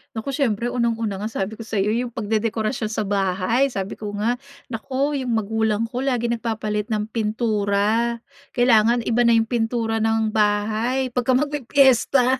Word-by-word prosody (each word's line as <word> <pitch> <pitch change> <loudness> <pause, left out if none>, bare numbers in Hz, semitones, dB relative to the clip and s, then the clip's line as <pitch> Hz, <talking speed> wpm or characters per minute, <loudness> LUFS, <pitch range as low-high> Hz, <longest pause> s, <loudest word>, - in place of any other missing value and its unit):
Nako, 225 +5 -3
siyempre 240 -4 0
unang 235 -2 +1
una 215 -4 -3
nga 210 - -3
sabi 220 0 -4
ko - - -5
sa’yo 205 -1 0
yung 240 +2 -1
pagdedekorasyon 220 +1 -1
sa 215 0 -2
bahay. 200 +5 +1
Sabi 195 -6 -5
ko 205 -1 -5
nga, 235 +4 0 0.3
“Naku, 275 +5 -1
yung 240 -2 -1
magulang 220 0 0
ko 250 - -4
laging 240 -3 0
nagpapalit 215 -2 -2
ng 215 -1 -2
pintura.” 215 +1 0 0.4
Kailangan 235 -1 +4
iba 235 +1 +1
na 235 - +5
yung 225 -1 +2
pintura 225 -1 0
ng 220 0 +1
bahay 220 +5 +1
pagka 250 +1 +1
magpipiyesta. 265 -2 +3
225 Hz, 155 wpm, -22 LUFS, 215-245 Hz, 0.4 s, na